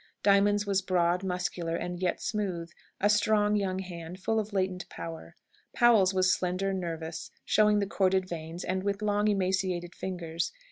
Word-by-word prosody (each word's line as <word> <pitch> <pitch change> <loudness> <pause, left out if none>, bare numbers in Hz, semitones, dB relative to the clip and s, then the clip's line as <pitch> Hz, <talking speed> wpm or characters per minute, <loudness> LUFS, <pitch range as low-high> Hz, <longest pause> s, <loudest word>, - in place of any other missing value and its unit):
Diamond's 205 +1 +4
was 195 -1 +1
broad, 180 0 +1
muscular, 180 -2 -2
and 175 +1 -4
yet 180 -2 0
smooth 180 -6 -3 0.3
a 205 - +3
strong 210 0 +3
young 190 -2 0
hand, 180 -1 -7
full 220 +3 0
of 215 0 -4
latent 185 -2 -2
power. 165 -1 -8 0.4
Powell's 225 -6 +5
was 185 -1 +3
slender, 185 +2 -1
nervous, 165 -3 -4 0.2
showing 210 0 +4
the 205 - +1
corded 190 -1 +1
veins, 165 0 -6
and 185 +1 -1
with 200 +1 -2
long 210 0 +2
emaciated 185 -3 0
fingers. 170 -3 -3
185 Hz, 155 wpm, -29 LUFS, 175-205 Hz, 0.4 s, Powell's